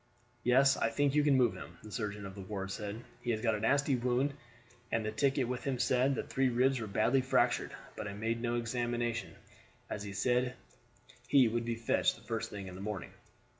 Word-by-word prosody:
"Yes, 135 +2 +5
I - - +1
think 145 -1 +1
you 150 0 +4
can 145 -2 +4
move 125 -3 +4
him," - - -10
the 110 - -10
surgeon 105 -3 -3
of 95 - -7
the 100 - -8
ward 95 0 -4
said. 105 +3 -5 0.2
"He 120 - -4
has 110 -2 0
got 115 -1 +2
a 105 - -1
nasty 140 +5 +2
wound, 125 +3 +1 0.6
and 115 -1 0
the 110 - -1
ticket 135 -1 +1
with 125 0 -3
him 135 -2 -1
said 130 +2 +2
that - - -3
three 135 0 +2
ribs 130 +2 +2
were 110 - -4
badly 115 +6 +2
fractured; 130 - +1 0.2
but - - -5
I 100 - -5
made 115 +2 -1
no 120 0 0
examination, 120 0 -2 0.6
as 105 - -3
he 100 -1 -6
said 125 +4 +1 0.7
he 135 -4 +6
would 115 +1 -1
be 120 0 -1
fetched 115 0 +1
the - - -17
first - - -3
thing 100 -2 -6
this 90 -1 -8
morning. 100 -3 -4
120 Hz, 210 wpm, -33 LUFS, 110-130 Hz, 0.7 s, he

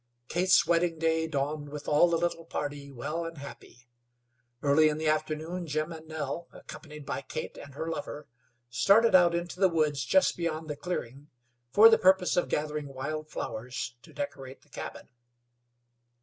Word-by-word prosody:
Kate's 180 +2 +4
wedding 170 -1 +2
day 160 0 +1
dawned 145 0 -2
with 145 0 -8
all 150 +4 +5
the 170 - +2
little 170 0 -1
party 145 -3 -5
well 150 +6 -4
and 165 -1 -7
happy. 120 -3 -11 0.8
Early 150 +2 +5
in 150 - -2
the 155 0 -2
afternoon 155 +3 -1
Jim 155 +2 -1
and 160 -1 -9
Nell, 160 +1 -4
accompanied 150 -2 -11
by - - -3
Kate 130 - -6
and 140 -1 -11
her 160 - -4
lover, 150 -2 -5 0.4
started 200 - +5
out 175 -2 +6
into 175 +1 -4
the 190 -1 +5
woods 150 -4 +1
just 190 +8 +3
beyond 160 -2 -3
the - - -3
clearing 145 -3 -5 0.4
for 210 - +8
the 225 0 +6
purpose 190 -1 +4
of 175 - +1
gathering 150 -1 -2
wild 155 +3 -5
flowers 120 +1 -5
to - - -16
decorate 135 - -6
the - - -27
cabin. - - -8
155 Hz, 165 wpm, -29 LUFS, 145-170 Hz, 0.8 s, for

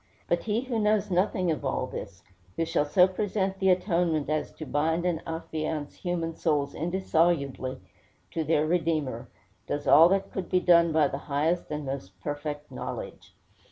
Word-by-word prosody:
But 175 - 0
he 220 +1 0
who 250 -3 -2
knows 210 -1 +1
nothing 185 -1 +1
of 155 - -3
all 135 -1 -1
this, 100 -7 -8 0.3
who 165 - 0
shall 165 -2 +1
so 180 +5 +5
present 190 0 -2
the 190 -1 +3
atonement 170 -5 +1
as 155 - -1
to 155 - -8
bind 160 +5 0
and 170 -3 0
affiance 155 -2 -4
human 170 -2 -2
souls 145 -4 0
indissolubly 165 -6 0 0.5
to 165 - -1
their 155 0 +2
Redeemer, 160 -4 -1 0.4
does 145 0 -3
all 160 +4 +8
that 195 +1 0
could 185 -3 -4
be 185 - +3
done 170 -2 +5
by 155 -2 +4
the 140 - -4
highest 155 +5 0
and 150 -1 -4
most 100 -9 -6
perfect 145 +5 -5
knowledge. - - -7
165 Hz, 165 wpm, -27 LUFS, 145-180 Hz, 0.5 s, all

